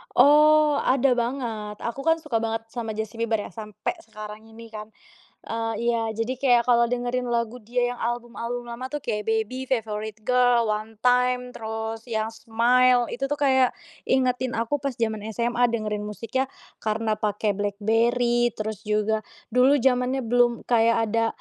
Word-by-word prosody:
Oh, 300 Hz, +1 st, +6 dB
ada 260 Hz, 0 st, +3 dB
banget. 235 Hz, -4 st, -3 dB
Aku 235 Hz, +4 st, -4 dB
kan 325 Hz, +1 st, +3 dB
suka 265 Hz, -, -5 dB
banget 225 Hz, 0 st, -3 dB
sama 225 Hz, -1 st, -5 dB
Justin 220 Hz, +1 st, -4 dB
Bieber 225 Hz, -1 st, 0 dB
ya, -, -, -5 dB
sampai 215 Hz, -, -5 dB
sekarang 215 Hz, -2 st, -9 dB
ini 225 Hz, +1 st, -13 dB
kan. 215 Hz, -1 st, -9 dB, 0.5 s
Eee, 225 Hz, 0 st, -3 dB, 0.2 s
iya, 225 Hz, -1 st, -1 dB
jadi 225 Hz, +4 st, -2 dB
kayak 245 Hz, -3 st, +4 dB
kalau 235 Hz, 0 st, +4 dB
dengerin 245 Hz, +1 st, -2 dB
lagu 235 Hz, 0 st, -1 dB
dia 245 Hz, +2 st, -1 dB
yang 245 Hz, -, -7 dB
album-album 240 Hz, 0 st, -3 dB
lama 240 Hz, +2 st, -5 dB
tuh, 295 Hz, +2 st, -5 dB
kayak 210 Hz, -4 st, -3 dB
Baby, 225 Hz, +4 st, -1 dB
Favorite 220 Hz, -3 st, -3 dB
Girl, 245 Hz, -1 st, +3 dB
One 215 Hz, +1 st, -3 dB
Time, 250 Hz, 0 st, +2 dB
terus 220 Hz, 0 st, -5 dB
yang 220 Hz, -2 st, -2 dB
Smile, 240 Hz, +2 st, +3 dB
itu 270 Hz, +3 st, -2 dB
tuh, 290 Hz, -, -1 dB
kayak 265 Hz, -3 st, +3 dB, 0.3 s
ingetin 255 Hz, -1 st, +1 dB
aku 230 Hz, +6 st, -1 dB
pas 275 Hz, -1 st, -3 dB
zaman 220 Hz, -2 st, -2 dB
SMA 240 Hz, +1 st, +2 dB
dengerin 215 Hz, -3 st, -2 dB
musiknya, 230 Hz, +5 st, -2 dB, 0.3 s
karena 215 Hz, 0 st, -1 dB
pakai 210 Hz, 0 st, 0 dB
BlackBerry. 230 Hz, +4 st, +1 dB
Terus 215 Hz, -1 st, -4 dB
juga, 215 Hz, +1 st, 0 dB, 0.2 s
dulu 250 Hz, +4 st, +5 dB
zamannya 255 Hz, +1 st, +2 dB
belum 240 Hz, 0 st, +2 dB
kayak 230 Hz, -1 st, +4 dB
ada, 230 Hz, +1 st, +2 dB
235 Hz, 155 wpm, -25 LUFS, 220-250 Hz, 0.5 s, Oh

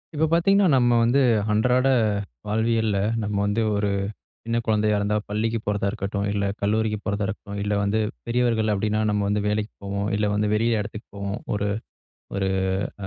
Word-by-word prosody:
இப்ப 160 Hz, +2 st, +2 dB
பார்த்தீங்கன்னா, 195 Hz, +4 st, +4 dB
நம்ம 120 Hz, -1 st, +4 dB
வந்து 125 Hz, +4 st, +3 dB, 0.3 s
அன்றாட 125 Hz, +4 st, +3 dB, 0.6 s
வாழ்வியல்ல, 110 Hz, -1 st, +1 dB, 0.3 s
நம்ம 105 Hz, 0 st, -2 dB
வந்து 105 Hz, +3 st, 0 dB
ஒரு 100 Hz, 0 st, 0 dB, 0.5 s
சின்ன 115 Hz, 0 st, -1 dB
குழந்தையா 105 Hz, -1 st, +2 dB
இருந்தா 100 Hz, +1 st, 0 dB
பள்ளிக்கு 110 Hz, +2 st, -1 dB
போறதா 105 Hz, -1 st, 0 dB
இருக்கட்டும், 100 Hz, 0 st, -3 dB
இல்ல 100 Hz, 0 st, -1 dB, 0.2 s
கல்லூரிக்கு 105 Hz, +1 st, +1 dB
போறதா 100 Hz, -1 st, -1 dB
இருக்கட்டும், 100 Hz, 0 st, -6 dB
இல்ல 105 Hz, -, -1 dB
வந்து 100 Hz, +2 st, +1 dB, 0.3 s
பெரியவர்கள் 115 Hz, -2 st, +1 dB
அப்பிடின்னா 105 Hz, +2 st, 0 dB
நம்ம 105 Hz, -1 st, +1 dB
வந்து 105 Hz, 0 st, +1 dB
வேலைக்கு 105 Hz, +1 st, -1 dB
போவோம். 100 Hz, +1 st, -2 dB
இல்ல 105 Hz, -, +1 dB
வந்து 105 Hz, +1 st, +1 dB
வெளிய 115 Hz, +1 st, +2 dB
இடத்துக்கு 105 Hz, +1 st, -8 dB
போவோம். 100 Hz, 0 st, -4 dB, 0.2 s
ஒரு 105 Hz, 0 st, -1 dB, 0.7 s
ஒரு 95 Hz, -1 st, 0 dB, 0.6 s
அ -, -, -3 dB
105 Hz, 160 wpm, -24 LUFS, 100-115 Hz, 0.7 s, பார்த்தீங்கன்னா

